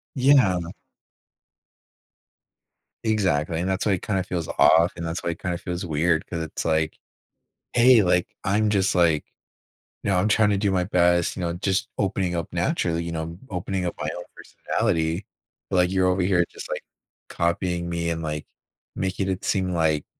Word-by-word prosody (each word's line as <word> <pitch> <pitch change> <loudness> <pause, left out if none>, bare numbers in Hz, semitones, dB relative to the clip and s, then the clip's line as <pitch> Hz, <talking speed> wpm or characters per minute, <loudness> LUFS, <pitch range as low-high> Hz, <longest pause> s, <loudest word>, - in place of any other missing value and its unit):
Yeah. 130 -9 +4 2.4
Exactly. 85 -8 +1
And 90 +2 -1
that's 95 +3 -1
why 100 - +3
it 90 - -2
kinda 95 -4 -1
feels 85 -3 -3
off, 85 +4 +5
and 85 - -5
that's 80 +2 -4
why 85 - 0
it 85 - -8
kinda 90 -2 -2
feels 90 +1 -5
weird 80 +1 +1
'cause 85 -2 -4
it's 80 - -5
like, 80 -1 0 0.8
hey. 120 -1 +6
Like, 90 -1 +2 0.2
I'm 105 +2 +2
just 100 -2 +2
like, 85 -4 +3 0.8
you 105 - -1
know, 95 - +2
I'm 90 +4 +2
trying 105 0 +4
to 100 - +2
do 100 -1 +1
my 90 -1 +1
best, 85 -2 +2
you - - -5
know, 85 -1 -1
just 95 +6 -1
opening 95 -3 0
up 85 - -4
naturally, 85 0 0
you 85 - -4
know, 80 +1 -5
opening 90 0 -3
up 85 - -3
my 75 - -2
own 90 - -6
personality. 80 +3 -1 0.5
Like, 90 -1 +3
you're 95 -1 +2
over 90 0 +1
here 90 -1 +3
just, - - -10
like, - - -4 0.4
copying 85 0 -1
me 85 0 -1
and, 80 0 -2
like, 75 -1 -4 0.5
making 95 +1 -2
it 95 -1 -3
seem 95 -2 0
like 80 -3 +1
90 Hz, 175 wpm, -24 LUFS, 85-95 Hz, 2.4 s, hey